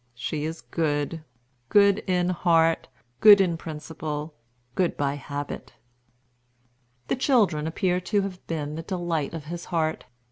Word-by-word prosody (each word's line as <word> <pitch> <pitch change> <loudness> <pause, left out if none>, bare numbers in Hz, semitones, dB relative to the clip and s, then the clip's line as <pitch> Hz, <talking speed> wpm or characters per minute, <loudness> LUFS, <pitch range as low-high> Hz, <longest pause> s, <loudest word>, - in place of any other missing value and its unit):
She 145 +5 -3
is 160 +1 -5
good; 155 0 -2 0.5
good 200 0 +5
in 180 -1 +2
heart, 165 -2 +2 0.3
good 210 -2 +9
in 180 -3 +2
principle, 155 -1 -6 0.4
good 180 -2 0
by 140 -1 0
habit." 145 -2 -6 1.3
The - - +1
children 210 - +2
appear 180 +2 0
to 205 +2 +1
have 185 -2 -6
been 150 -3 -3
the 160 - -4
delight 170 -4 -2
of 155 -3 -7
his 170 +2 -6
heart. 160 -2 -1
165 Hz, 135 wpm, -26 LUFS, 150-180 Hz, 1.3 s, good